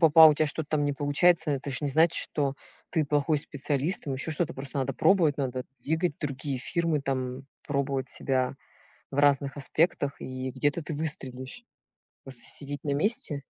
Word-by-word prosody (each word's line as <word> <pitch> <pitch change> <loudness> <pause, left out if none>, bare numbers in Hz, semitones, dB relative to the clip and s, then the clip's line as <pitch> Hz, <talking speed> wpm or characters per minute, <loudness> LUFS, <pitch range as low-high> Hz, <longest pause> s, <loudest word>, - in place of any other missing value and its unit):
попал 160 -1 +9
у 150 - +2
тебя 155 +1 +2
что-то 150 +1 -4
там 150 -2 +2
не 145 - +1
получается- 150 +4 +3
это 140 0 -3
ж 130 - -3
не 145 - -1
значит, 160 +4 +4
что 140 -2 0 0.4
ты 160 -3 +1
плохой 145 +1 +1
специалист, 145 +4 -2
там 140 - -3
еще 140 +4 -4
что-то. 160 +1 -1
Просто 135 +1 -5
надо 135 0 0
пробовать, 160 +1 +3
надо 130 -2 -2 0.2
двигать 160 +1 0
другие 140 -2 -3
фирмы 165 +2 0
там, 130 -1 -3 0.2
пробовать 140 -2 -1
себя 130 -1 0 0.6
в 135 - -6
разных 140 -1 +3
аспектах 145 0 +1
и 130 0 -4
где-то 145 +5 0
ты 155 - -5
выстрелишь. 145 - -5 0.6
Просто 130 -3 -9
сидеть 145 -1 -2
на 145 - 0
месте 150 -3 +1
145 Hz, 175 wpm, -28 LUFS, 135-155 Hz, 0.6 s, попал